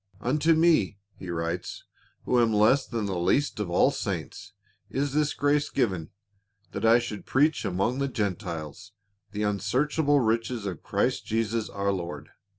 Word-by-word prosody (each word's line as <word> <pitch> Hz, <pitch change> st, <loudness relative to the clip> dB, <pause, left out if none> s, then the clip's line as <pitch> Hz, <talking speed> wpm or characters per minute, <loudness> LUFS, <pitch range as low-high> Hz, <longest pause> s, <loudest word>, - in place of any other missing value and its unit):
"Unto 150 Hz, +8 st, +2 dB
me," 155 Hz, -, +3 dB, 0.2 s
he 90 Hz, -, -9 dB
writes, 85 Hz, +1 st, -4 dB, 0.4 s
"who 125 Hz, -1 st, +3 dB
am 115 Hz, -1 st, +3 dB
less 110 Hz, +6 st, +3 dB
than 115 Hz, -3 st, -3 dB
the 95 Hz, -3 st, -2 dB
least 105 Hz, +10 st, +1 dB
of 105 Hz, -4 st, -2 dB
all 85 Hz, -, +4 dB
saints, -, -, -5 dB, 0.4 s
is 140 Hz, 0 st, -1 dB
tliis 150 Hz, 0 st, 0 dB
grace 145 Hz, +1 st, +2 dB
given, 95 Hz, -, -1 dB, 0.6 s
that -, -, -5 dB
I 115 Hz, +1 st, +6 dB
should 120 Hz, -4 st, -5 dB
preach 150 Hz, +4 st, +2 dB
among 100 Hz, +8 st, 0 dB
the 140 Hz, -, 0 dB
Gentiles 100 Hz, -, -4 dB, 0.4 s
the 105 Hz, +1 st, -3 dB
unsearchable 145 Hz, +8 st, +1 dB
riches 115 Hz, -1 st, 0 dB
of 95 Hz, -6 st, -5 dB
Christ -, -, -1 dB
Jesus 115 Hz, 0 st, -1 dB
our 100 Hz, 0 st, -1 dB
Lord. 85 Hz, -5 st, -5 dB
110 Hz, 155 wpm, -27 LUFS, 95-135 Hz, 0.6 s, I